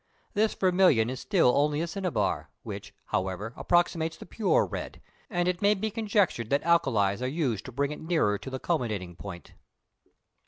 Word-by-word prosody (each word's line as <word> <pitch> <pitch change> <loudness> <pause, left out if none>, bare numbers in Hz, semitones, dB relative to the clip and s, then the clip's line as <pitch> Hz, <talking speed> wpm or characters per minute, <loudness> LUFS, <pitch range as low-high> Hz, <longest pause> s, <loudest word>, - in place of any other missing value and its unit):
This 215 +1 +2
vermilion 180 - +4
is 130 - -5
still 175 -11 +3
only 145 +1 +2
a 165 - 0
cinnabar, 180 0 -1
which, - - -7 0.2
however, 95 +5 -1
approximates 165 -2 +1
the - - -10
pure 210 +3 +2
red, - - -6 0.3
and 175 -4 0
it 180 -1 -1
may 205 +1 +4
be 215 +2 -2
conjectured 200 - +1
that 140 +1 +2
alkalis 115 -12 +2
are 125 - 0
used 130 - -1
to 130 - -7
bring 140 +3 -1
it 150 - -7
nearer 160 - +1
to - - -7
the 130 - -4
culminating 110 - -2
point. 85 0 -9
150 Hz, 170 wpm, -28 LUFS, 115-180 Hz, 0.3 s, vermilion